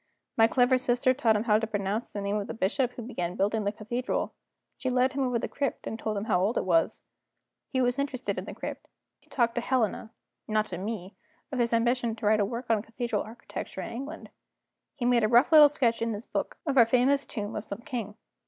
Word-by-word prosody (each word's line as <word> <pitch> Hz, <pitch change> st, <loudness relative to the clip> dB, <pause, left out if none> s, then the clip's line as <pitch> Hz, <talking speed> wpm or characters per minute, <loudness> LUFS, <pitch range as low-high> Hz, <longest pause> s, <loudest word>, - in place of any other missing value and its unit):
My 225 Hz, 0 st, +6 dB
clever 250 Hz, +2 st, +3 dB
sister 250 Hz, +1 st, +2 dB
taught 235 Hz, -5 st, +2 dB
him 210 Hz, -, +1 dB
how 215 Hz, -2 st, +4 dB
to 225 Hz, -, -2 dB
pronounce 205 Hz, +1 st, -2 dB
the 205 Hz, -, -4 dB
name 200 Hz, +1 st, -1 dB
of 205 Hz, -, -3 dB
the -, -, -5 dB
bishop 240 Hz, +5 st, 0 dB
who 240 Hz, -, -7 dB
began 180 Hz, -7 st, -4 dB
building 210 Hz, +2 st, 0 dB
the 200 Hz, -, +1 dB
cathedral; 240 Hz, +4 st, -3 dB, 0.4 s
she 260 Hz, -, -3 dB
led 255 Hz, +1 st, +2 dB
him 275 Hz, -, -1 dB
over 250 Hz, -2 st, +1 dB
the -, -, -2 dB
crypt, 280 Hz, -3 st, -3 dB
and 225 Hz, -, -4 dB
told 215 Hz, -1 st, -2 dB
him 200 Hz, -, -2 dB
how 205 Hz, -5 st, +1 dB
old 205 Hz, +5 st, +1 dB
it -, -, 0 dB
was. 165 Hz, -3 st, +2 dB, 0.7 s
He 260 Hz, -3 st, 0 dB
was 245 Hz, +2 st, +1 dB
interested 270 Hz, -2 st, -2 dB
in -, -, -7 dB
the -, -, -8 dB
crypt; -, -, -6 dB, 0.3 s
he -, -, -29 dB
talked 235 Hz, -3 st, +1 dB
to 240 Hz, -, -1 dB
Helena 235 Hz, -3 st, 0 dB, 0.4 s
(not 215 Hz, 0 st, +1 dB
to 175 Hz, -2 st, -5 dB
me) 200 Hz, -1 st, -5 dB, 0.4 s
of 265 Hz, -, -2 dB
his 235 Hz, -1 st, +2 dB
ambition 235 Hz, 0 st, +1 dB
to 220 Hz, -, -7 dB
write 215 Hz, +1 st, +4 dB
a 205 Hz, -, +3 dB
work 235 Hz, +4 st, -4 dB
on 220 Hz, -2 st, +3 dB
cathedral 235 Hz, +2 st, -3 dB
architecture 230 Hz, +2 st, -7 dB
in -, -, -6 dB
England; 275 Hz, +7 st, -7 dB, 0.6 s
he 245 Hz, -, -3 dB
made 240 Hz, -2 st, +4 dB
a -, -, +4 dB
rough 240 Hz, +7 st, +5 dB
little 305 Hz, -2 st, +9 dB
sketch 240 Hz, -6 st, +1 dB
in 230 Hz, -1 st, 0 dB
his 210 Hz, +2 st, -6 dB
book -, -, -3 dB
of 275 Hz, -4 st, +3 dB
our 235 Hz, -, +8 dB
famous 260 Hz, +4 st, +3 dB
tomb 210 Hz, -1 st, -5 dB
of 210 Hz, -, -3 dB
some 200 Hz, 0 st, -7 dB
king. 235 Hz, -6 st, -5 dB
230 Hz, 235 wpm, -28 LUFS, 210-250 Hz, 0.7 s, little